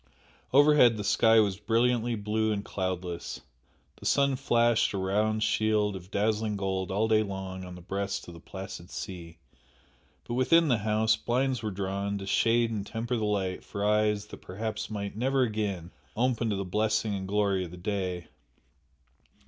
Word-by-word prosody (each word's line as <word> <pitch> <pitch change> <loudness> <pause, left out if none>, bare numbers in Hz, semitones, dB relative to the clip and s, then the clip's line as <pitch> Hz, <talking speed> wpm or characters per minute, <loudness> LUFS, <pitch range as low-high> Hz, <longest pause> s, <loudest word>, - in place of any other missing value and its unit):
Overhead 140 -4 +6
the 105 - -3
sky 110 +2 +5
was 100 -2 +1
brilliantly 115 +2 +1
blue 110 +1 0
and 100 -1 -2
cloudless, 90 -6 -4 0.6
the - - -12
sun 140 -1 +3
flashed 120 -3 +2
a - - -2
round 105 +3 +1
shield 105 -2 +1
of 95 -1 -9
dazzling 105 +1 0
gold 95 -1 -2
all 105 +4 +1
day 110 -1 +4
long 95 -2 -5
on 90 -1 -8
the 90 - -11
breast 100 +1 -3
of 85 - -9
the 85 - -11
placid 95 0 -8
sea, 85 -3 -7 0.9
but - - -3
within 155 +6 +4
the 120 -4 +3
house, 110 +1 +2
blinds 125 +2 0
were 110 - -2
drawn 100 +1 -2
to 95 - -6
shade 115 +3 +2
and 105 -2 -3
temper 120 +3 -2
the 110 -2 -1
light 95 -3 -1
for 100 -1 -4
eyes 105 0 +2
that - - -10
perhaps 110 +4 -4
might 100 -2 -4
never 130 +3 +2
again 105 -6 -2 0.2
open 120 -1 +1
to 105 - 0
the 100 0 -3
blessing 110 +2 0
and 95 -1 -4
glory 100 -2 +1
of 90 - -7
the 90 - -10
day. 90 -2 -3
105 Hz, 175 wpm, -28 LUFS, 95-110 Hz, 0.9 s, Overhead